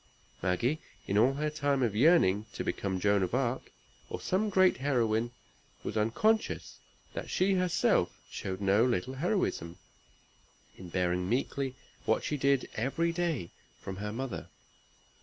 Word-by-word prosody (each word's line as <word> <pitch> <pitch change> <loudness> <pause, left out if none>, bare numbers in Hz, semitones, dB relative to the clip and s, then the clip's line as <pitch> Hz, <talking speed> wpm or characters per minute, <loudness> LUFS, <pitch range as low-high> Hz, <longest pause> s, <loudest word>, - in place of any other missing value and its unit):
Maggie, 115 - +1 0.3
in 100 - -1
all 120 +6 +5
her 150 +1 -1
time 145 -3 +1
of 110 -4 0
yearning 110 - +4
to - - -3
become 95 -2 -2
Joan 100 +1 +3
of 95 +5 0
Arc, 130 -1 -1 0.4
or - - -4
some 205 +4 0
great 185 -2 +4
heroine, 120 -4 +1 0.5
was - - -4
unconscious 165 - +1 0.3
that - - -5
she 190 +2 +2
herself 180 -2 +2
showed 95 0 -4
no 100 +3 +4
little 125 0 0
heroism, 135 - -1 1.0
in 90 - -10
bearing 90 0 0
meekly 135 +2 -1 0.3
what - - +2
she 150 - -1
did 140 -1 +2
every 140 +9 0
day 165 - -1 0.3
from 95 -1 -6
her 105 +1 -4
mother. 130 +3 -4
125 Hz, 140 wpm, -31 LUFS, 100-150 Hz, 1.0 s, all